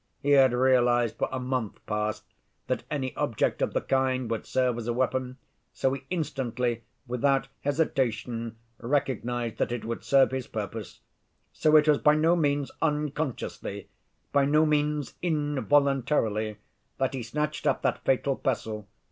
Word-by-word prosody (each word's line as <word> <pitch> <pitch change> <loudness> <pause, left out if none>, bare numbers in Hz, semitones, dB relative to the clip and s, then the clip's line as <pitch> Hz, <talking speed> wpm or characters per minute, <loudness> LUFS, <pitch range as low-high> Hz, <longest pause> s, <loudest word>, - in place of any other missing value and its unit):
He 145 - 0
had 135 -2 +6
realized 120 -2 +3
for - - 0
a 130 - -2
month 125 -4 -2
past 105 0 -2 0.4
that - - -1
any 135 -3 -3
object 130 -7 0
of - - 0
the - - +1
kind 130 -3 0
would 115 - -3
serve 125 -2 +1
as 115 - -6
a 120 - +1
weapon, 130 +1 -1 0.4
so 130 - +1
he 135 0 -6
instantly, 125 -8 -2 0.2
without 135 +2 +1
hesitation, 120 -6 -1 0.2
recognized 120 -3 -1
that - - 0
it 120 -2 -3
would 115 +1 -4
serve 135 -1 +4
his 130 -1 -3
purpose. 110 0 -6 0.5
So 155 0 +3
it 155 0 +6
was 150 -2 +5
by 150 0 +5
no 160 +3 +4
means 145 -4 0
unconsciously, 150 -3 -2 0.4
by 140 -1 +4
no 150 +2 +4
means 150 -1 0
involuntarily, 140 - +1 0.4
that 135 0 0
he 130 - -3
snatched 150 +6 -2
up - - +1
that - - 0
fatal 135 +1 +2
pestle. 110 -6 -3
130 Hz, 150 wpm, -27 LUFS, 120-145 Hz, 0.5 s, had